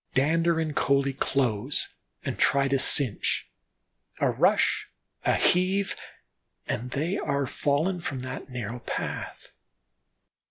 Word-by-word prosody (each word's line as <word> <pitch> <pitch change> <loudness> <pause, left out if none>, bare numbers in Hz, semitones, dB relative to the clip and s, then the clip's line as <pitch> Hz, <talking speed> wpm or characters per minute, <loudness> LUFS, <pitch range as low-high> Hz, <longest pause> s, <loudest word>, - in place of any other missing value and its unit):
Dander 165 +5 +3
and 155 -2 -2
Coalie 140 0 +2
close 130 -1 0 0.4
and - - -3
try 140 0 +3
to 135 0 +1
clinch; 130 -4 +3 0.7
a - - +2
rush, - - +2 0.4
a - - +3
heave, 190 +2 +2 0.7
and 125 +3 -3
they 155 +9 -1
are 140 0 0
fallen 150 +8 0
from 135 -6 -4
that 130 +1 -6
narrow 125 -2 -5
path. - - -5
140 Hz, 115 wpm, -27 LUFS, 130-165 Hz, 0.7 s, Dander